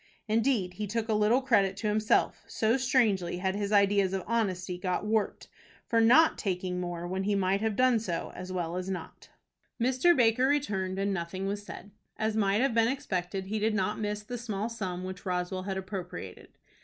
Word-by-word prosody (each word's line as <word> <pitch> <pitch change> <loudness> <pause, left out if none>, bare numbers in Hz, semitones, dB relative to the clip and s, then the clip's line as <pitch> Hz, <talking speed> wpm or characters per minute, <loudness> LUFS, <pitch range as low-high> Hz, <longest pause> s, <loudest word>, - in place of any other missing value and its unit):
Indeed, 220 -4 +1
he 210 +3 -4
took 225 +2 -2
a - - +3
little 215 +5 +3
credit 200 -7 +2
to 215 - -2
himself, 215 +1 +1
so 220 +2 +1
strangely 225 -10 +1
had 190 +1 -1
his 205 0 -2
ideas 200 -2 +3
of 190 -2 -2
honesty 185 -5 -1
got 180 +2 -2
warped, 215 0 -1 0.4
for 230 -1 +2
not 255 +8 +5
taking 180 -2 -2
more 175 -1 -4
when 190 +2 -2
he 205 0 +1
might 195 +1 +1
have 220 -2 0
done 255 0 +4
so 180 -6 -4
as 185 0 -7
well 175 -1 -2
as 185 +1 -4
not. 185 -2 -7 0.5
Mr. 260 +8 +3
Baker 245 +1 +4
returned, 195 -10 0
and 200 0 0
nothing 185 +1 -4
was 200 +1 -2
said. 205 0 -10 0.3
As 220 0 -1
might 205 0 +2
have 265 -2 +2
been 225 0 +4
expected, 190 -8 -2
he 215 +3 -2
did 215 +1 +1
not 210 +1 -1
miss 210 -1 -3
the 245 +3 -6
small 220 -2 -3
sum 190 -6 -4
which 185 0 -7
Roswell 180 -1 -2
had 190 - -2
appropriated. 185 - -7
205 Hz, 195 wpm, -29 LUFS, 185-225 Hz, 0.5 s, not